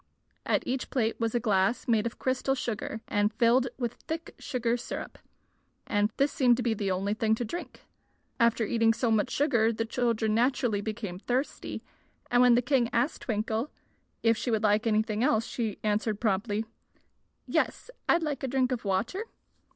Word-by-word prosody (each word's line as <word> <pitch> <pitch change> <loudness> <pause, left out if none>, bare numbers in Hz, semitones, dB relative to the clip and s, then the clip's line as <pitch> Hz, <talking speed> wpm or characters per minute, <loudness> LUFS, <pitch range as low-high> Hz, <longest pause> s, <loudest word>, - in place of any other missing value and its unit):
At - - +2
each 255 +1 -2
plate 230 -4 0
was 230 0 -1
a - - +3
glass 205 0 +1
made 225 -1 +2
of 235 - -7
crystal 260 +1 0
sugar 225 -3 -4
and 205 0 +1
filled 240 +3 +3
with 240 -2 -2
thick 325 +1 -4
sugar 240 -3 -1
syrup, 245 - -6 0.7
and 205 +1 +1
this 280 +1 +2
seemed 245 -4 +4
to 250 - -2
be 230 -1 +1
the 200 -2 -2
only 190 +2 0
thing 220 0 +1
to 240 - -3
drink. 345 +11 -7 0.6
After 230 -1 +3
eating 225 +1 +3
so 235 -1 0
much 215 -2 +2
sugar 235 -6 +2
the 225 0 -2
children 225 -2 0
naturally 240 -2 +1
became 205 -4 -5
thirsty, 250 +6 -3 0.5
and 245 0 +5
when 250 -1 +6
the 245 - +2
king 250 -2 +2
asked 240 +6 0
Twinkle 220 +3 -1 0.5
if 230 0 +4
she 220 - -3
would 220 -2 +1
like 215 +2 +3
anything 215 0 +1
else 230 -5 +2
she 225 -6 -3
answered 215 0 0
promptly: 210 0 0 0.8
"Yes, - - -1 0.2
I'd 335 0 +4
like 295 -4 -2
a 270 - -2
drink 260 0 +1
of 250 - -2
water." 215 - -1
230 Hz, 175 wpm, -28 LUFS, 215-250 Hz, 0.8 s, when